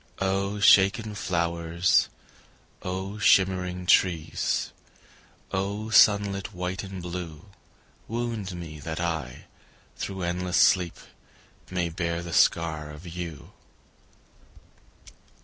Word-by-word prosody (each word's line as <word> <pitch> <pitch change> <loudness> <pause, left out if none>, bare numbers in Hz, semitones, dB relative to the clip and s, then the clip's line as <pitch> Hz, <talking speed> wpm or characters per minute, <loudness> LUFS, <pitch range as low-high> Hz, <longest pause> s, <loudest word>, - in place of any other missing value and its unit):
O 100 +1 -1
shaken 105 +1 +5
flowers, 85 -2 +1 0.7
O 95 +3 -4
shimmering 90 -2 +2
trees, 85 -3 +1 0.8
O 100 +3 -3
sunlit 100 -2 +4
white 90 +2 -3
and 95 -2 -7
blue, 85 -2 -6 0.6
Wound 115 -5 -3
me, 80 -3 -8
that 80 +2 -5
I, 80 -7 -3 0.5
through 95 -2 -4
endless 90 +1 -1
sleep, 90 -3 +4 0.7
May 90 -2 -1
bear 85 +1 -3
the 85 -1 -7
scar 80 -2 +2
of 75 +4 -11
you. 85 -3 -7
90 Hz, 95 wpm, -26 LUFS, 85-95 Hz, 0.8 s, shaken